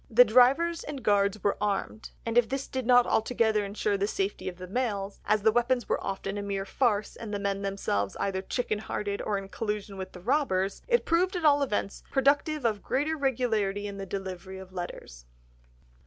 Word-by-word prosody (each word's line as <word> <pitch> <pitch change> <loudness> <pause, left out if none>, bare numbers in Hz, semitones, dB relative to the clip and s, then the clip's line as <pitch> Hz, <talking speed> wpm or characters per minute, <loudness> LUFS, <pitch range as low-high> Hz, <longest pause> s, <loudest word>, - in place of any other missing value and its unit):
The 245 +2 +7
drivers 270 +9 +4
and 285 -3 -6
guards 200 0 +2
were 200 - +1
armed, 210 +1 -2 0.2
and 230 0 -2
if 240 -2 +4
this 270 +1 -3
did 260 -3 -4
not 245 -1 +6
altogether 220 -2 +2
ensure 205 0 -1
the 200 +1 0
safety 195 -2 -2
of 180 - -10
the 185 - -7
mails—as 205 -1 -1
the 220 - +5
weapons 240 +1 +1
were - - -1
often 195 +1 -3
a - - -3
mere 200 -1 -3
farce, 210 -1 0
and 225 -2 -7
the 205 - -1
men 200 0 -2
themselves 195 - -2
either 190 -1 -1
chicken 215 +1 -2
hearted 205 -1 -3
or 205 - -1
in 195 0 -6
collusion 210 -1 -4
with 190 0 -6
the 180 - -9
robbers—it 245 - +1
proved, 360 +3 +2
at 345 -3 -1
all 290 -1 +5
events, 210 -6 -1
productive 285 +1 +2
of 215 -3 +1
greater 295 +4 0
regularity 225 -8 0
in 200 -1 -5
the 195 - -5
delivery 190 -1 -6
of 190 0 -11
letters. 60 - -7
210 Hz, 190 wpm, -28 LUFS, 195-250 Hz, 0.2 s, The